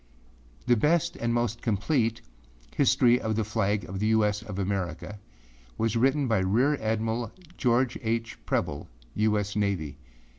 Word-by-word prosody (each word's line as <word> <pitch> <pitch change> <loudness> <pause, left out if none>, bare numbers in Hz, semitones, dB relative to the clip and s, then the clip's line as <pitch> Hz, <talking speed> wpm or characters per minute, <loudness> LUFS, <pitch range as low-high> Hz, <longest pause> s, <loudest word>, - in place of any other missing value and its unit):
The 120 - +4
best 155 +8 +2
and 120 0 -1
most 120 -1 -1
complete 115 +2 0 0.5
âHistory 125 -3 +4
of 110 -1 -2
the 110 - +1
Flag 105 -1 0
of 95 +1 -5
the 105 - +1
U. 110 -1 +4
S. 105 0 -1
of 110 -3 -8
Americaâ 100 +1 -3 0.6
was 115 0 0
written 135 +4 +2
by 110 -4 +2
Rear 115 +10 +2
Admiral 110 +1 -1 0.2
George 125 0 +1
H. 115 0 -2
Preble, - - -1 0.3
U. 105 0 +2
S. 105 0 -3
Navy. 90 -9 -1
110 Hz, 150 wpm, -27 LUFS, 105-120 Hz, 0.6 s, The